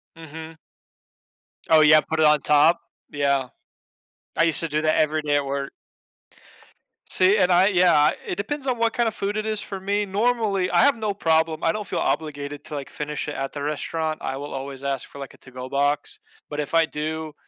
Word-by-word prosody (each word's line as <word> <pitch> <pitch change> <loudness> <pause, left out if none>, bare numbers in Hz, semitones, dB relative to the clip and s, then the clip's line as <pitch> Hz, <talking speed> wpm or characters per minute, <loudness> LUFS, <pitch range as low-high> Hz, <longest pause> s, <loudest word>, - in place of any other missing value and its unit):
Mhm. 160 0 -10 1.1
Oh 160 -1 +7
yeah, 155 0 +7
put 160 0 -4
it 155 - +5
on 150 -2 +5
top? 150 +3 +4 0.3
Yeah. 140 -2 0 0.9
I - - +4
used 165 -2 +1
to 165 - -2
do 150 +1 0
that 155 0 +2
every 155 0 +1
day 145 -1 +1
at 145 - 0
work. 140 0 -3 1.4
See, 190 +3 +3
and 180 -2 +3
I 180 +2 +5
yeah, 180 -3 +4
uh, 150 0 +5
it - - -3
depends 275 +8 -4
on 250 -3 -1
what 230 0 +1
kinda 235 -2 +1
food 205 +1 -3
it 215 - -2
is 215 -1 -2
for 195 -1 -6
me. 205 +2 -1
Normally, 205 -2 0
I - - +3
have 280 -4 +4
no 215 -2 -2
problem, 160 -3 +1
I 165 - +3
don't 210 +1 -5
feel - - -3
obligated 145 -2 -3
to, 150 - -7
like, 140 -1 -6
finish 150 0 -5
it 150 - -4
at 135 0 -3
the 145 - -5
restaurant. 155 +2 -3
I 135 - -3
will 145 +1 -7
always 135 0 -6
ask 135 -1 -2
for, 140 - -13
like, 135 - -8
a - - -18
to-go 130 0 -10
box, 145 +1 -1 0.3
but 150 0 -5
if 150 +2 -4
I 165 -1 +5
do, 155 0 -4
155 Hz, 210 wpm, -23 LUFS, 145-190 Hz, 1.4 s, Oh